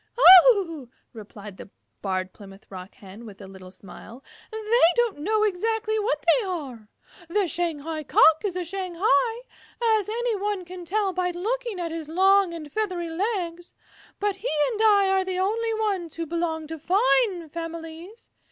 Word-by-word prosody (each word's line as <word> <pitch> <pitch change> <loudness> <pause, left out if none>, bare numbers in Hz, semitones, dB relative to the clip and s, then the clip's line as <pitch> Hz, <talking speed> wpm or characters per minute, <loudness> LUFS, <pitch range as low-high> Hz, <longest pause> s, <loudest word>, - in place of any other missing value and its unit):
"Oh," 370 - +6 0.2
replied 210 -2 -11
the - - -11 0.3
Barred 185 -1 -3
Plymouth 195 -1 -14
Rock 185 0 -10
Hen 205 -1 -13
with 205 -4 -12
a 200 - -10
little 190 -1 -12
smile, 210 +6 -13 0.3
"they 440 -4 +2
don't 475 -9 0
know 425 +7 0
exactly 435 +2 -1
what 430 +4 -2
they - - +4
are. 265 - -6 0.4
The 405 +3 +1
Shanghai 320 -2 -3
Cock 315 +2 +4
is 395 -4 -3
a 365 - -2
Shanghai, 390 +6 0 0.6
as 415 - -6
any 470 +1 -1
one 400 -2 -3
can 360 0 -10
tell 395 +1 -1
by 360 0 -1
looking 440 +4 -3
at 335 -2 -4
his 320 -2 -6
long 385 +2 +3
and 310 -3 -8
feathery 360 -4 -3
legs, 350 -2 -4 0.4
but 405 -1 -1
he 440 - -4 0.2
and 440 -2 -3
I 410 -3 +4
are 385 0 +2
the 370 -1 -4
only 445 +4 -1
ones 395 -7 -2
who 330 - -4
belong 325 -1 -3
to 320 +1 -8
fine 385 0 +1
families. 330 +5 -9
360 Hz, 160 wpm, -24 LUFS, 320-420 Hz, 0.6 s, Oh